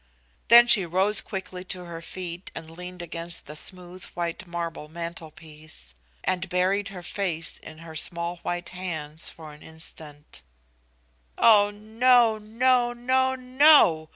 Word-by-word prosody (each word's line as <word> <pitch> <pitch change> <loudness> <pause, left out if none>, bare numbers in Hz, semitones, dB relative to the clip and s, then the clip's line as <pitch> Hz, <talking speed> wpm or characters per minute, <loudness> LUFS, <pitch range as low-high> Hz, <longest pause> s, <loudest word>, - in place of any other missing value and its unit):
Then 235 +1 +9
she 215 -5 +7
rose 190 +5 +2
quickly 190 -2 -6
to 180 -1 -5
her 170 -1 -8
feet 175 +1 -6
and 160 0 -8
leaned 180 +1 -8
against 170 0 -3
the 150 - -9
smooth 180 +2 -7
white 170 +1 -4
marble 170 -3 -5
mantelpiece, 160 - -7 0.3
and 185 +1 -1
buried 190 +3 +1
her 185 -2 -9
face 170 -5 -3
in 160 - -12
her 160 - -10
small 170 +2 -2
white 175 +1 -4
hands 160 -4 -4
for 155 -2 -11
an 150 - -16
instant. 155 -2 -6 1.0
"Oh 205 -3 +6
no, 220 +2 +3
no, 240 +3 +2
no, 260 +2 +1
no!" 255 - +5
180 Hz, 135 wpm, -25 LUFS, 165-210 Hz, 1.0 s, Then